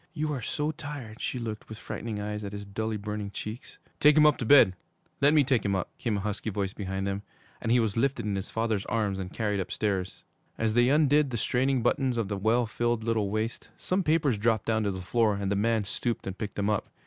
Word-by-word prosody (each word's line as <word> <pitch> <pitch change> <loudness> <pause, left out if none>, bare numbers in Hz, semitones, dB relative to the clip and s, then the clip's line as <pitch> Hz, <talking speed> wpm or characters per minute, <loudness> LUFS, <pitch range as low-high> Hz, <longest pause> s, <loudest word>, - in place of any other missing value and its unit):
You 150 0 -1
are 130 - -3
so 150 +7 -1
tired!' 145 -8 -8
She - - -2
looked, 110 -3 -5
with 110 - -7
frightened 110 0 -5
eyes, 105 0 -4
at 100 0 -5
his 100 0 -6
dully 110 +2 -3
burning 105 0 -4
cheeks. 110 +4 -7 0.2
'Take 150 +1 +6
him 155 - +7
up 150 -1 +5
to 120 - -2
bed 110 -10 +7 0.5
let 140 +1 +6
me 150 -2 +5
take 130 -3 +1
him 100 -1 +1
up,' 95 - -3
came 110 -4 0
a - - -2
husky 105 +2 -3
voice 100 -1 -2
behind 95 -1 -3
them; 100 0 -2 0.4
and 115 - -1
he 125 - +5
was 110 -4 0
lifted 135 +2 0
in 105 -2 -1
his 95 +1 -4
father's 115 -3 -1
arms 105 -4 0
and 90 -1 -5
carried 105 -3 -1
upstairs. 95 -1 -2 0.3
As 110 -1 0
they 120 +2 +4
undid 150 0 +4
the 120 - -2
straining 130 +3 +1
buttons 125 +1 +1
of 110 -4 -1
the 100 - -1
well 115 +5 +2
filled 120 0 -1
little 110 -3 0
waist, 110 +3 -3
some 185 +2 0
papers 155 - +2
dropped 110 -1 +1
down 110 -1 +1
to 100 - +1
the 95 -1 -5
floor 110 +3 +2
and 100 0 -2
the - - +2
man 110 +1 +2
stooped 115 +3 -3
and 95 - -4
picked 105 0 -5
them 100 0 -1
up. 105 - -1
110 Hz, 240 wpm, -28 LUFS, 100-125 Hz, 0.5 s, him